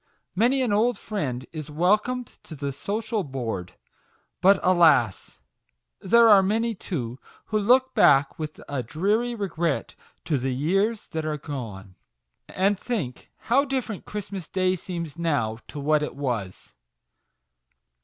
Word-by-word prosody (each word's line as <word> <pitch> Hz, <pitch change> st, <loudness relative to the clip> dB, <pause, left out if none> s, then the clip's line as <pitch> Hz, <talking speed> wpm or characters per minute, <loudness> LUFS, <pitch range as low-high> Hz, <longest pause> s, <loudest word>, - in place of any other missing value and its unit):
Many 245 Hz, +7 st, +2 dB
an 230 Hz, -5 st, 0 dB
old 225 Hz, +2 st, +2 dB
friend 135 Hz, -, -4 dB
is 155 Hz, -2 st, -7 dB
welcomed 210 Hz, +10 st, 0 dB
to 160 Hz, -, -9 dB
the 140 Hz, -1 st, -3 dB
social 210 Hz, -, -2 dB
board. 115 Hz, -, -4 dB, 0.7 s
But, 190 Hz, +1 st, +6 dB
alas! 160 Hz, -, +3 dB, 0.6 s
there 235 Hz, +4 st, +5 dB
are 205 Hz, -3 st, +8 dB
many, 225 Hz, +4 st, 0 dB
too, 130 Hz, -, -5 dB, 0.3 s
who 215 Hz, -, 0 dB
look 255 Hz, +5 st, +3 dB
back 140 Hz, +1 st, +4 dB
with 155 Hz, -1 st, -5 dB
a 140 Hz, -2 st, -2 dB
dreary 205 Hz, -, 0 dB
regret 170 Hz, -7 st, -2 dB, 0.3 s
to 150 Hz, -5 st, 0 dB
the 130 Hz, 0 st, -2 dB
years 195 Hz, -, 0 dB
that 160 Hz, -3 st, -3 dB
are 155 Hz, -1 st, -2 dB
gone, 115 Hz, -10 st, -7 dB, 0.6 s
and 195 Hz, +1 st, +1 dB
think, 190 Hz, -, -4 dB
how 265 Hz, +4 st, +3 dB
different 260 Hz, -7 st, -3 dB
Christmas 200 Hz, -4 st, -6 dB
Day 185 Hz, -1 st, +1 dB
seems 170 Hz, -3 st, -6 dB
now 140 Hz, -10 st, 0 dB
to 150 Hz, -, -7 dB
what 150 Hz, +1 st, +2 dB
it 150 Hz, -, -4 dB
was 120 Hz, -9 st, -4 dB
175 Hz, 135 wpm, -25 LUFS, 140-210 Hz, 0.7 s, are